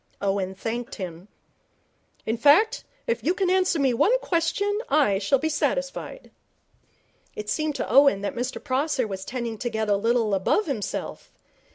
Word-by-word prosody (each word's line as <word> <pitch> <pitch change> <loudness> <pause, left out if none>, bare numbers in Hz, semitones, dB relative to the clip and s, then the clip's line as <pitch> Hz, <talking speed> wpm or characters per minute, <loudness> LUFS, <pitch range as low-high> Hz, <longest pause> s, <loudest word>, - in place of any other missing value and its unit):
Owen 195 -1 -1
thanked 235 +4 -4
him. 180 -2 -7 1.0
'In 220 - 0
fact, 380 - +4 0.2
if 230 -1 -1
you 345 +7 +1
can 370 -1 +1
answer 370 -2 +2
me 270 -4 +2
one 460 - +3
question 400 +3 0
I 275 -10 +3
shall 210 +7 +2
be 315 - -2
satisfied.' - - -3 1.0
It 210 0 -4
seemed 310 -2 -1
to - - -3
Owen 275 -8 +5
that 205 - -3
Mr 245 +2 -3
Prosser 270 -1 0
was 190 -2 -5
tending 235 -1 -5
to 245 - -2
get 220 -1 -2
a 205 - +4
little 225 +1 +1
above 195 - +1
himself. 265 - -5
250 Hz, 160 wpm, -25 LUFS, 210-315 Hz, 1.0 s, Owen